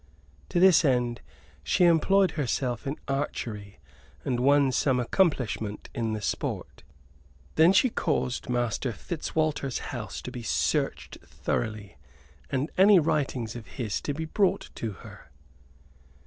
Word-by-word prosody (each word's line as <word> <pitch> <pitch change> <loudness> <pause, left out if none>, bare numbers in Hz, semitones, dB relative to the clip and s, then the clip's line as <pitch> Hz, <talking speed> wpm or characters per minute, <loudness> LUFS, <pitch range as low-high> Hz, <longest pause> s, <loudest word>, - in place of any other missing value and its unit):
To 175 - +1
this 185 -1 +6
end 125 -4 +1 0.4
she 85 - +2
employed 180 +2 +4
herself 130 -5 -2
in 140 - -3
archery 110 -7 -4 0.5
and 125 -2 0
won 140 +1 +4
some 130 0 +2
accomplishment 125 - 0
in 115 -2 -2
the 105 -1 -4
sport; - - -3 0.7
then 160 +3 +6
she 230 +5 +4
caused 125 -11 -1
Master 120 0 -1
Fitzwalter's 155 -4 -2 0.2
house - - -5
to - - -6
be 125 - -6
searched 115 - -1
thoroughly 110 -7 -4 0.5
and 135 +3 -1
any 200 +1 +8
writings 145 -8 0
of 120 -2 -8
his 115 -7 -2
to 145 - -3
be 160 +2 -3
brought 190 +4 0
to 110 -3 -4
her. - - -13
135 Hz, 130 wpm, -27 LUFS, 120-160 Hz, 0.7 s, any